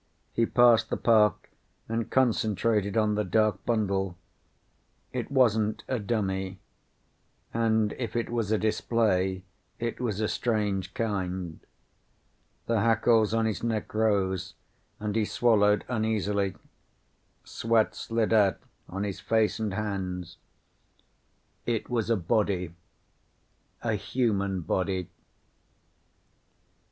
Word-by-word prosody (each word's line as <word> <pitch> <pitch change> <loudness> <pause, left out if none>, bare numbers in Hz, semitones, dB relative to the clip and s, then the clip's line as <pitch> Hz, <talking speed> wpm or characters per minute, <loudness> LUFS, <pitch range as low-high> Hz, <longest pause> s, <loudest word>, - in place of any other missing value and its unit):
He 115 - +2
passed 120 -2 +5
the - - -1
park 110 -3 +3 0.4
and 115 0 -2
concentrated 110 -4 +1
on 105 -1 +3
the 105 0 0
dark 105 0 +1
bundle. 100 -5 0 1.0
It 125 0 -3
wasn't 110 -6 +2
a 130 - -1
dummy. 95 -3 -2 1.0
And 110 -2 +2
if 120 -2 -4
it 115 - 0
was 115 -3 -1
a 110 - +3
display 100 -4 +1 0.3
it 115 0 -3
was 110 -5 -1
a 110 - +1
strange 105 -6 -1
kind. 95 -6 -3 1.1
The 115 -1 +1
hackles 115 0 +3
on 115 0 +1
his 110 -2 -2
neck 115 -2 -2
rose 100 -4 0 0.4
and 105 0 -3
he 110 - +2
swallowed 105 -2 +3
uneasily. 105 -4 0 0.9
Sweat 115 -1 +1
slid 115 -1 -1
out 100 -3 +4 0.3
on 95 +2 -3
his 100 -2 -4
face 110 -1 +1
and 110 -2 -1
hands. 95 -4 -4 1.3
It 120 0 -1
was 115 -2 0
a 115 - +3
body. 95 -2 0 1.1
A 115 -2 0
human 100 -3 0
body. 95 +1 -1
105 Hz, 110 wpm, -28 LUFS, 95-115 Hz, 1.3 s, passed